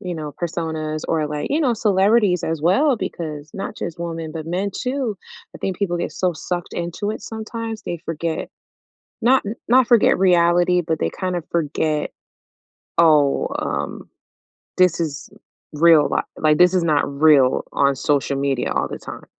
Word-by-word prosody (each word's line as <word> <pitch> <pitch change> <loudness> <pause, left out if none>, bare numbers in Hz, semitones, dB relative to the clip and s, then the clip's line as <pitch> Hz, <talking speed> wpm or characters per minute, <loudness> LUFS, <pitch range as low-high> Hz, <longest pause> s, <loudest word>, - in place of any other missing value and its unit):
you 180 -1 -5
know, 150 -2 -6
personas 160 -2 -3
or, 155 -2 +1
like, 150 -1 -3
you 305 +3 +1
know, 250 -6 +2
celebrities 200 -3 +2
as 160 -2 -2
well, 265 - +3
because 155 -6 -6
not 195 +2 -5
just 170 -1 -5
women 165 -2 -5
but 160 -1 -6
men 190 +3 -1
too. 250 -4 -2 0.4
I - - -10
think 190 -2 -3
people 180 -4 -1
get - - -2
so 180 -1 0
sucked 175 +2 -4
into 175 +5 -3
it - - -8
sometimes 225 0 -6
they 170 - -4
forget 165 0 -3 0.7
not 260 +3 +4 0.3
not 250 0 +5
forget 235 -3 +5
reality, 175 -1 +4
but 160 -2 -2
they 80 - 0
kinda 180 -2 -3
forget, 155 -1 -1 0.9
"Oh, 150 -4 +4
um, - - -4 0.7
this 180 -2 +4
is 155 -4 -4 0.4
real 160 -1 +5
li - - +1 0.2
like, 155 -1 +3
this 180 +1 +5
is 180 - +2
not 150 -3 +2 0.2
real 145 -5 +5
on 140 0 +2
social 140 0 0
media 135 -2 -1
all - - -1
the - - -6
time." - - -10
170 Hz, 165 wpm, -21 LUFS, 155-195 Hz, 0.9 s, not